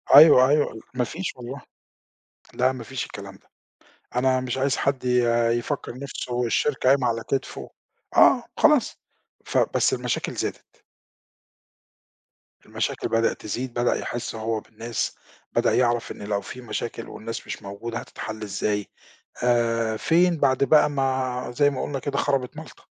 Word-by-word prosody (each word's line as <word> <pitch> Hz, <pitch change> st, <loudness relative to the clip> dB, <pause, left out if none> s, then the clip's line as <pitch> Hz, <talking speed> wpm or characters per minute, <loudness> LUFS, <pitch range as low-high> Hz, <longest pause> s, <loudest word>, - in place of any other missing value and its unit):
أيوه 140 Hz, -3 st, +9 dB
أيوه 145 Hz, -6 st, +1 dB
ما 125 Hz, -1 st, 0 dB
فيش 170 Hz, +9 st, -4 dB
والله، 125 Hz, +2 st, -8 dB, 0.9 s
لا 130 Hz, +1 st, +2 dB
ما 125 Hz, -3 st, -8 dB
فيش 130 Hz, +2 st, -4 dB
الكلام -, -, -9 dB
ده -, -, -28 dB, 0.7 s
أنا 130 Hz, +1 st, +3 dB
مش 130 Hz, 0 st, -3 dB
عايز 135 Hz, +1 st, +1 dB
حد 135 Hz, -2 st, -1 dB
ي 125 Hz, -1 st, +3 dB, 0.3 s
يفكر 120 Hz, +1 st, -4 dB
نفسه 125 Hz, -3 st, -3 dB
الشركة 130 Hz, +2 st, +1 dB
قايمة 135 Hz, -1 st, +4 dB
على 115 Hz, -1 st, 0 dB
كتفه، 135 Hz, -, -3 dB, 0.5 s
آه -, -, +6 dB
خلاص، -, -, +4 dB, 0.5 s
فبس -, -, +2 dB
المشاكل -, -, -2 dB
زادت. -, -, -6 dB, 1.8 s
المشاكل -, -, -2 dB
بدأت 115 Hz, 0 st, +1 dB
تزيد، 120 Hz, +4 st, -4 dB
بدأ 120 Hz, 0 st, +1 dB
يحس 120 Hz, -1 st, -4 dB
هو 110 Hz, 0 st, -2 dB
بالناس 115 Hz, +2 st, -4 dB, 0.4 s
بدأ -, -, +2 dB
يعرف 120 Hz, -2 st, +1 dB
إن -, -, -8 dB
لو 100 Hz, -1 st, -1 dB
في 125 Hz, -, -9 dB
مشاكل 115 Hz, -1 st, -5 dB
والناس 115 Hz, +1 st, -7 dB
مش -, -, -6 dB
موجودة 105 Hz, +4 st, -5 dB
هتتحل 110 Hz, 0 st, -7 dB
إزاي 105 Hz, 0 st, -2 dB, 0.6 s
آآ، 115 Hz, -2 st, +2 dB
فين 170 Hz, +7 st, +3 dB
بعد 135 Hz, -1 st, +3 dB
بقى 150 Hz, +1 st, +5 dB
ما 130 Hz, -3 st, -1 dB
زي 145 Hz, +1 st, +4 dB
ما 135 Hz, -, -4 dB
قلنا 140 Hz, -, -3 dB
كده 140 Hz, +1 st, -3 dB
خربت 135 Hz, -4 st, 0 dB
مالطة. -, -, -11 dB
125 Hz, 145 wpm, -24 LUFS, 115-135 Hz, 1.8 s, أيوه